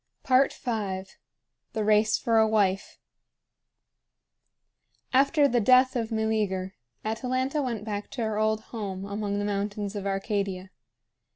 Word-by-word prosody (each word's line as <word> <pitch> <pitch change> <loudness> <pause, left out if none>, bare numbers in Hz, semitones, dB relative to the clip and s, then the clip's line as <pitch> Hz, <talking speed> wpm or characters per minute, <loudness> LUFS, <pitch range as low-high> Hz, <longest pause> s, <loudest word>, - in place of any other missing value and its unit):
V. 260 - 0 1.4
THE 220 - -1
RACE 215 +1 +3
FOR 230 -1 +2
A 220 - +5
WIFE. 200 -3 +1 2.2
After 280 +3 +4
the 245 -2 +2
death 255 +3 +5
of 230 -2 -2
Meleager, 210 -4 -1 0.3
Atalanta 255 +6 -1
went 230 -6 -3
back 205 -1 -4
to 240 - -2
her 215 -1 -1
old 215 0 +1
home 195 -4 -4
among 200 0 -3
the 205 - -1
mountains 205 0 -3
of 200 -1 -3
Arcadia. 195 -1 -2
215 Hz, 120 wpm, -27 LUFS, 200-230 Hz, 2.2 s, A